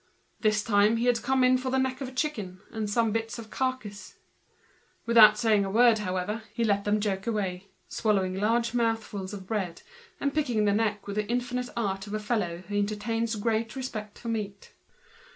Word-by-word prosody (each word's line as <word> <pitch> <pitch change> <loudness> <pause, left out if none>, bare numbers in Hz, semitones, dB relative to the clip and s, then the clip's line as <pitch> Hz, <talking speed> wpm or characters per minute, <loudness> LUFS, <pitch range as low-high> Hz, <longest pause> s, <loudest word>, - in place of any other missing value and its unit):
This 215 -1 +2
time 210 +1 +3
he 235 - 0
had 245 -1 +2
come 265 -1 +2
in 255 0 +4
for 260 0 -3
the 265 - +1
neck 260 0 -1
of 270 - -3
a - - -8
chicken 220 - -3
and 215 -2 -3 0.2
bits 225 +1 -2
of 225 -2 -9
the - - -11
carcase. 210 -7 -3 0.9
Without 220 -2 +7
saying 215 -3 +3
a 195 - -3
word 230 +2 +5 0.6
he 235 - 0
let 200 -2 +1
them 210 +1 +2
joke 195 -1 -2
away, 195 -4 -2 0.2
swallowing 195 -4 0
large 225 +4 +1
mouthfuls 225 -5 -1
of 195 -2 -8
bread, 190 -5 -3 0.4
and 280 -1 -1
picking 245 -8 +1
the 205 - +3
neck 210 -1 0
with 200 0 -5
the 210 -1 0
infinite 245 +1 -1
art 195 -3 -2
of 205 - -4
a - - -1
fellow 200 -6 -2
who 205 0 -2
entertains 220 +2 -1
a - - -5
great 225 +1 -1
respect 215 -6 -5
for 235 - -6
meat. 205 -3 -4
220 Hz, 190 wpm, -28 LUFS, 205-235 Hz, 0.9 s, Without